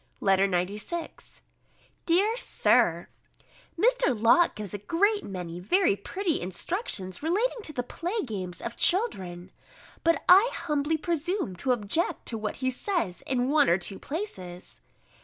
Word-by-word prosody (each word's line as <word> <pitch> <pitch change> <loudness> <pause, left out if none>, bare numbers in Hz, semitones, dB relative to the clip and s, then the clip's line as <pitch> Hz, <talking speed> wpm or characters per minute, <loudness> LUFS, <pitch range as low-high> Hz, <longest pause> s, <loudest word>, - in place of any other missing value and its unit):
B. - - -8
LETTER 195 0 +4
XCVI 200 - -4 0.7
DEAR 390 +7 +3
SIR, - - +2 0.7
Mr. 440 - +2
Locke 240 +11 +4
gives 210 -2 -6
a 205 - -4
great 405 - +1
many 180 -3 -6
very 335 - +2
pretty 370 - -2
instructions 185 - -2
relating 425 +10 0
to 320 - -5
the 250 -4 -3
play 355 - -4
games 185 -7 -5
of 235 - -5
children: 190 - 0 0.5
but 335 0 +2
I 390 +7 +7
humbly 300 0 -1
presume 340 - -2
to 260 +7 0
object 245 +8 0
to 225 - -3
what 215 - -3
he 260 - +2
says 255 - -2
in 255 0 0
one 295 0 +4
or 170 - +4
two 190 +2 -1
places. 185 - -7
270 Hz, 140 wpm, -27 LUFS, -, 0.7 s, I